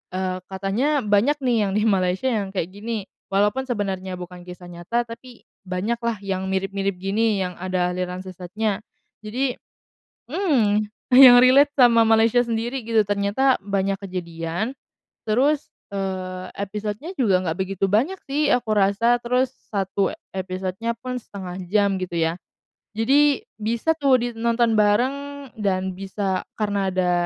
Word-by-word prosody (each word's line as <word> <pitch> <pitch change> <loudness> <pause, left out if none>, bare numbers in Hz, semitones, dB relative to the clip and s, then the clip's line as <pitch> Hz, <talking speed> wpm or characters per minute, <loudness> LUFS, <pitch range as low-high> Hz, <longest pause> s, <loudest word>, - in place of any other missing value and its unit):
eee, 185 0 -2
katanya 210 +10 0
banyak 210 +8 +3
nih, 245 -2 +2
yang - - -2
di 210 - +2
Malaysia 195 +3 +1
yang 210 -3 -1
kayak 185 -1 -2
gini. 215 +1 -4 0.2
Walaupun 210 +7 +1
sebenarnya 190 -5 -3
bukan 180 0 -10
kisah 180 0 -10
nyata, 175 +8 -2
tapi 235 +1 -12 0.2
banyak 205 +6 -2
lah, 235 -1 -1
yang 190 -1 -2
mirip-mirip 195 0 -1
gini, 200 +2 0
yang 180 - -3
ada 185 -1 0
aliran 180 +1 -4
sesatnya. 190 +3 -3 0.4
Jadi 250 +5 -2 0.8
mmm, 310 - +2 0.5
yang 245 -2 +10
relate 280 +3 +6
sama 235 -4 +5
Malaysia 225 +2 +4
sendiri 235 +2 -3
gitu, 225 -2 +3
ternyata 205 +6 +1
banyak 195 -1 -1
kejadian, 180 +4 -4 0.5
terus, 280 +7 +2 0.2
eee, 185 -1 -4
episodenya 210 - -4
juga 195 -7 +3
nggak 160 -1 -2
begitu 195 0 -1
banyak 270 - +2
sih 290 +1 0
aku 230 -3 -5
rasa, 210 +4 +3
terus 250 +2 0 0.2
1 195 -1 0 0.2
episodenya 190 +4 -3
pun 250 +1 -5
1/2 185 -4 -8
jam, 200 -1 +2
gitu 180 -2 -4
ya. 165 +1 0 0.6
Jadi 280 +5 +3 0.2
bisa 230 +9 0
tuh 280 -4 +4
di 245 - 0
nonton 230 0 +1
bareng 215 +5 +3 0.4
dan 190 -2 0
bisa 195 0 -2 0.2
karena 205 -2 0
ada, 180 -1 +1
205 Hz, 140 wpm, -23 LUFS, 190-235 Hz, 0.8 s, yang